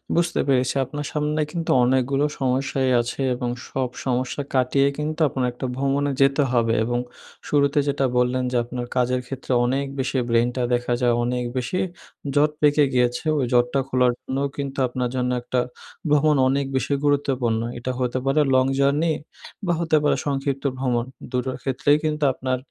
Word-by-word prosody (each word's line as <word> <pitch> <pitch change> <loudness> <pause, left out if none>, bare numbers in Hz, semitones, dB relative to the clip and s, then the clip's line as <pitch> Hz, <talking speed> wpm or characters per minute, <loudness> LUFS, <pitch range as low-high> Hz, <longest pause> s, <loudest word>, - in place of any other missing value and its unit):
বুঝতে 170 0 +1
পেরেছি। 130 -1 +2
আপনার 145 +2 -5
সামনে 150 +1 0
কিন্তু 170 -2 -2
অনেকগুলো 130 +3 +2
সমস্যাই 130 0 0
আছে, 120 +3 -5
এবং 120 0 -3 0.2
সব 130 -2 -1 0.2
সমস্যা 130 +2 -1
কাটিয়ে 135 +1 +3
কিন্তু, 155 +1 -3
আপনার 125 0 -1
একটা 120 - -5
ভ্রমণে 140 +1 0
যেতে 135 +1 +4
হবে। 115 -2 +2
এবং 120 0 0 0.5
শুরুতে 140 0 +2
যেটা 140 -1 +1
বললেন 125 +1 +2
যে, 125 - +1
আপনার 120 +1 -5
কাজের 125 0 +1
ক্ষেত্রে 135 0 -6
অনেক 135 +3 0
বেশি 130 0 -1
ব্রেইনটা 120 +2 +1
দেখা 120 0 0
যায়, 120 -1 +3
অনেক 125 0 -1
বেশি 130 +9 -1 0.6
জট 150 +1 +4
পেকে 150 0 +5
গিয়েছে। 125 +3 +1
ওই 135 - +1
জটটা 125 +2 +3
খোলার 125 -2 +3
জন্যও 135 +2 -2
কিন্তু 140 -1 -4
আপনার 125 0 -2
জন্য 125 0 0
একটা 125 +1 -1 0.5
ভ্রমণ 150 0 +4
অনেক 140 +1 +1
বেশি 130 +2 0
গুরুত্বপূর্ণ। 130 -5 +1 0.2
এটা 120 +2 -3
হতে 125 0 0
পারে 135 +3 +3
লং 130 - +4
জার্নি 145 +4 +2 0.5
বা 175 - +2
হতে 160 -2 +2
পারে 145 - +3
সংক্ষিপ্ত 140 -1 -2
ভ্রমণ। 125 -2 0 0.3
২ 125 - 0
টোর 130 - -3
ক্ষেত্রেই 140 +2 +2
কিন্তু 150 -1 -1
আপনার 130 0 -2
130 Hz, 165 wpm, -23 LUFS, 125-145 Hz, 0.6 s, পেকে